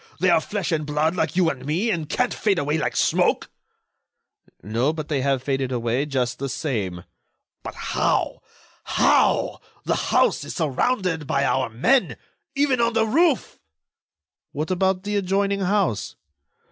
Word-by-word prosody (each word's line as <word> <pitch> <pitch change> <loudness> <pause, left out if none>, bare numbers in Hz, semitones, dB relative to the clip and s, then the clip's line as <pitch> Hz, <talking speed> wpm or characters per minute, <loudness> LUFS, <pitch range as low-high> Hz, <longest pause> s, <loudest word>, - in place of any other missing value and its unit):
They 180 +1 +3
are 160 - +4
flesh 195 0 -3
and 155 -2 0
blood 150 +3 0
like 160 -2 -1
you 175 -3 +3
and 130 -2 -9
me, 175 - 0
and 160 -5 -3
can't 250 -1 0
fade 205 -4 +1
away 150 +1 0
like - - -2
smoke." - - +1 1.1
"No, 115 +8 0
but 155 -2 -6
they 145 -4 0
have 135 -1 0
faded 135 -1 -1
away 120 +3 -1
just 130 -4 -1
the 135 0 -3
same." 105 - -3 0.6
"But - - -8
how? - - -1 0.4
How? - - +2 0.2
The - - 0 0.2
house - - +3
is - - -7
surrounded 165 - 0
by 140 0 +1
our 130 -2 +1
men—even 255 - 0
on 235 0 +2
the 225 -1 +2
roof." 305 +4 +1 0.9
"What 155 +5 -3
about 190 0 +1
the 205 0 -1
adjoining 200 +1 0
house?" 190 - 0
160 Hz, 150 wpm, -23 LUFS, 135-200 Hz, 1.1 s, are